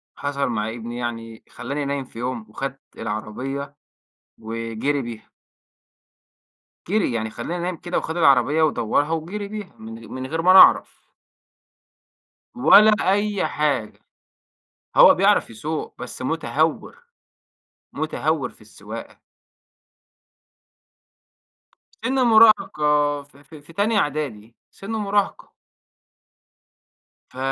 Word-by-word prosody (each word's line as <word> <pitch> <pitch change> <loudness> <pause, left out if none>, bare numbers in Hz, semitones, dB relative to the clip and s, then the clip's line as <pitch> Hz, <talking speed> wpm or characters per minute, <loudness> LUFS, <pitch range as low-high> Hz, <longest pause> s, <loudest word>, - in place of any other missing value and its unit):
حصل 140 -1 -2
مع 110 -1 -2
ابني، 120 +1 -7
يعني 115 -2 -6
خلّاني 145 0 -5
نايم 140 -1 -3
في 115 - -12
يوم، 120 -2 -4
وخد 135 +4 -5 0.2
العربية 130 +6 -5 0.6
وجِري 115 +5 -3
بيها. 115 -2 -9 1.6
جِري، 200 - +1
يعني 110 -1 -2
خلّاني 170 +9 -5
نايم 180 -2 -3
كده 175 +2 -3
وخد 160 +2 -3
العربية 140 0 +4
ودوَّرها 145 +1 +1
وجِري 175 +6 -4
بيها، 210 -2 -8
من 115 +1 -10
غ - - -13
من 130 0 -6
غير 160 +2 -2
ما 185 +2 +5
أنا 190 - +9
أعرف. - - +5 1.5
ولا 220 -3 +7 0.2
أي 205 0 0
حاجة، 145 -8 -2 1.0
هو - - +8
بيعرف - - +2
يسوق 150 +8 -5
بس - - -7
مُتهور، - - -1 0.9
مُتهور - - -1
في - - -21
السواقة. - - -10 2.8
سِن 260 - 0
مراهقة، 150 - +4
في 140 0 -21
في 150 +1 -14
في 155 +3 -17
تانية 210 +4 +1
إعدادي، 130 - -3 0.2
سِن 195 +3 -9
مراهقة. 205 -2 -1 1.8
ف 130 - -16
145 Hz, 110 wpm, -22 LUFS, 115-175 Hz, 2.8 s, أنا